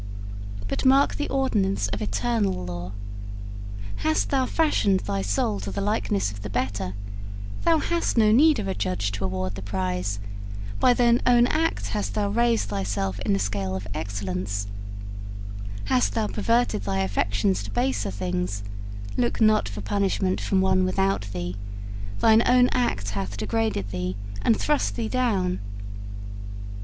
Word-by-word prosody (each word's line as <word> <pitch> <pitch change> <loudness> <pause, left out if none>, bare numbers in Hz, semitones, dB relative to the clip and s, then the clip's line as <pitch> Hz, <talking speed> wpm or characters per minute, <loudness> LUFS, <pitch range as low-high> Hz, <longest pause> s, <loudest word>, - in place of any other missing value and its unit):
But - - -1
mark 270 +2 +5
the 295 - -2
ordinance 205 - +1
of 105 0 -3
eternal 100 -3 0
law. 90 +1 -5 1.1
Hast 100 0 +1
thou 260 -1 +2
fashioned 215 -12 +3
thy 100 -1 -1
soul 100 +1 0
to 100 +1 -4
the - - -3
likeness 150 - +1
of 100 -1 -9
the 105 - -5
better, 95 0 -2 0.7
thou 330 -1 +5
hast 340 -3 0
no 215 -2 +6
need 300 +6 +6
of 210 -3 -2
a 190 - 0
judge 100 - -1
to 100 -1 -4
award 95 0 -1
the 95 - -6
prize 95 0 -2 0.6
by 245 - +5
thine 240 0 +4
own 240 -1 +7
act 320 +5 0
hast 210 -1 -2
thou 205 -1 +1
raised 235 - +2
thyself 100 -1 -1
in 110 -2 +1
the - - +3
scale 100 -1 -1
of 95 +1 -4
excellence; 100 0 -2 1.2
hast 100 0 +2
thou - - +2
perverted 230 - +1
thy 95 -1 0
affections 100 0 +1
to 100 - -6
baser 120 0 0
things, 95 +1 -2 0.5
look 120 -1 +1
not 215 - +4
for 100 0 -6
punishment 190 - +1
from 190 -1 +2
one 185 0 +3
without 190 - +1
thee 90 -1 -3 0.7
thine 220 0 +7
own 250 0 +6
act 100 - 0
hath 100 0 -3
degraded 220 - 0
thee, 90 0 -2 0.3
and 225 - +4
thrust 295 -1 +1
thee 225 - -1
down. 210 -8 +1
105 Hz, 150 wpm, -26 LUFS, -, 1.2 s, own